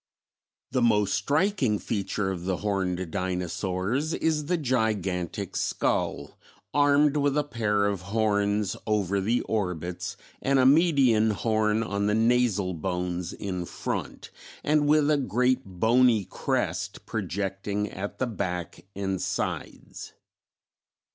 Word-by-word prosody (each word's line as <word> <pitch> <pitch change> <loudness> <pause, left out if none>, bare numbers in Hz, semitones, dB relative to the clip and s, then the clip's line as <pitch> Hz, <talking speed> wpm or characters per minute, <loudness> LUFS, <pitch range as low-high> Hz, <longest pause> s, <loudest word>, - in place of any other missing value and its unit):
The 130 - +1
most 105 -4 +3
striking 145 - +1
feature 100 -1 -2
of 90 -2 -5
the 95 -1 0
Horned 95 -4 -2
Dinosaurs 95 - -1
is 155 -2 0
the 180 - +1
gigantic 110 - -1
skull, - - -1 0.3
armed 145 0 +4
with 145 0 +1
a 150 - +3
pair 110 -7 0
of 100 -3 -1
horns 105 0 0
over 100 -2 +1
the 115 +5 +1
orbits 90 -5 -3 0.2
and 140 0 +2
a 130 - +4
median 135 -7 +5
horn 110 +2 +1
on 100 -1 -1
the 105 - +2
nasal 115 -5 +2
bones 90 +1 -3
in 90 -3 -4
front, - - -5 0.3
and 150 0 +2
with 150 0 +4
a 150 - +4
great 125 +1 +1
bony 110 +3 +3
crest - - -2
projecting 100 +2 -2
at 100 +1 -6
the 130 - 0
back 90 -8 -4
and 95 -1 -2
sides. - - -4
105 Hz, 120 wpm, -27 LUFS, 95-130 Hz, 0.3 s, median